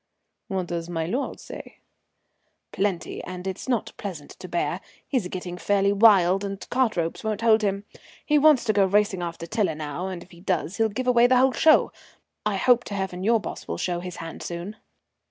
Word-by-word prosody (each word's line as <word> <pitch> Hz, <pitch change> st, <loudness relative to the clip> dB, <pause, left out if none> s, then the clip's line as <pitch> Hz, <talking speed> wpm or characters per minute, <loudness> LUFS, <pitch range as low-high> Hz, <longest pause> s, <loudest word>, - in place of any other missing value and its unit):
"What 190 Hz, -2 st, -2 dB
does 170 Hz, -1 st, -4 dB
my 165 Hz, -2 st, -2 dB
lord 245 Hz, -, -3 dB
say?" -, -, -10 dB, 0.9 s
"Plenty, 195 Hz, -3 st, -2 dB
and 180 Hz, 0 st, -7 dB
it's 190 Hz, +6 st, -5 dB
not 240 Hz, -4 st, -1 dB
pleasant 175 Hz, -8 st, -7 dB
to 185 Hz, -, -8 dB
bear. 175 Hz, -1 st, -2 dB, 0.3 s
He's 250 Hz, -10 st, 0 dB
getting 180 Hz, -1 st, -6 dB
fairly 200 Hz, +1 st, +2 dB
wild, 195 Hz, -3 st, +5 dB
and 195 Hz, -1 st, -5 dB
cart 250 Hz, -5 st, +1 dB
ropes 165 Hz, -1 st, -2 dB
won't 215 Hz, -1 st, -2 dB
hold 225 Hz, -1 st, +5 dB
him. 200 Hz, -1 st, -1 dB, 0.4 s
He 300 Hz, -1 st, +4 dB
wants 295 Hz, -3 st, +5 dB
to 215 Hz, -, +1 dB
go 200 Hz, -1 st, +4 dB
racing 200 Hz, -1 st, +2 dB
after 170 Hz, -1 st, -5 dB
Tiler 190 Hz, -3 st, 0 dB
now, 155 Hz, +4 st, -4 dB
and 180 Hz, -2 st, -6 dB
if -, -, -22 dB
he 170 Hz, -1 st, -15 dB
does 185 Hz, -1 st, -1 dB
he'll 225 Hz, -1 st, +2 dB
give 250 Hz, +5 st, -4 dB
away 245 Hz, -1 st, +5 dB
the 255 Hz, 0 st, +4 dB
whole 260 Hz, +1 st, +4 dB
show. 315 Hz, +6 st, +4 dB, 0.6 s
I 210 Hz, -, 0 dB
hope 240 Hz, +4 st, +4 dB
to 205 Hz, -, -5 dB
heaven 190 Hz, -2 st, -3 dB
your 230 Hz, +2 st, +3 dB
boss -, -, -7 dB
will -, -, -3 dB
show 175 Hz, -1 st, -1 dB
his 180 Hz, 0 st, -7 dB
hand 165 Hz, -1 st, -8 dB
soon." 175 Hz, +5 st, -6 dB
195 Hz, 200 wpm, -25 LUFS, 175-220 Hz, 0.9 s, wild